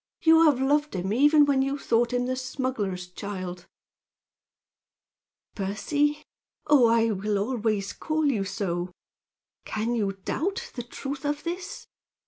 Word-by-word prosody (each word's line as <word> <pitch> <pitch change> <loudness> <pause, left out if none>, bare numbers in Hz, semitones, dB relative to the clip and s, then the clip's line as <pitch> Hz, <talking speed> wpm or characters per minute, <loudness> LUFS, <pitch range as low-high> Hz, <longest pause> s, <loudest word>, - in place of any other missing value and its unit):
You 325 0 +7
have 290 -5 +4
loved 295 0 +1
him, 190 +2 -1
even 295 +4 +6
when 275 -2 +2
you 275 +1 0
thought 235 -3 +1
him 245 0 0
the 255 +1 -1
smuggler's 255 -8 -3
child." 185 -1 -6 1.9
"Percy! 290 +10 -1 0.4
Oh, 285 -5 +6
I 230 0 +3
will 205 +1 -1
always 215 -2 -1
call 310 0 -1
you 240 -9 +1
so! 185 -3 -3 0.7
Can 220 +2 -2
you 205 -4 0
doubt 325 - -3
the 245 - -4
truth 270 +3 -6
of 295 0 -2
this?" 355 +2 -5
245 Hz, 130 wpm, -26 LUFS, 200-290 Hz, 1.9 s, You